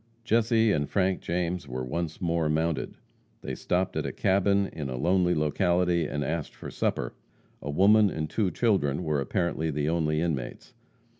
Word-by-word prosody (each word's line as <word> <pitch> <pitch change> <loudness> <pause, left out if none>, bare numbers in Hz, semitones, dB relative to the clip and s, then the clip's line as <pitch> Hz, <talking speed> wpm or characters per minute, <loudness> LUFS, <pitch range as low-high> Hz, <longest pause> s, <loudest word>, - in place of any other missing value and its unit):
Jesse 115 -1 +3
and 75 -6 0
Frank 95 -1 +1
James 90 +1 -2
were 65 +1 -4
once 80 +4 -3
more 85 -3 0
mounted. 80 -3 -1 0.5
They - - -4
stopped 90 +1 -1
at - - -1
a - - -3
cabin 100 +1 +2
in 75 -4 -5
a 65 - -4
lonely 90 +4 +2
locality 85 +2 +1
and 75 0 -2
asked 80 +2 -3
for - - -8
supper. - - -2 0.5
A 75 - -6
woman 100 +7 +5
and 80 -3 -3
two 100 +4 0
children 90 - +1
were 75 -3 0
apparently 80 +1 -1
the 75 0 -1
only 80 -2 +1
inmates. 75 -7 -3
85 Hz, 165 wpm, -27 LUFS, 75-95 Hz, 0.5 s, woman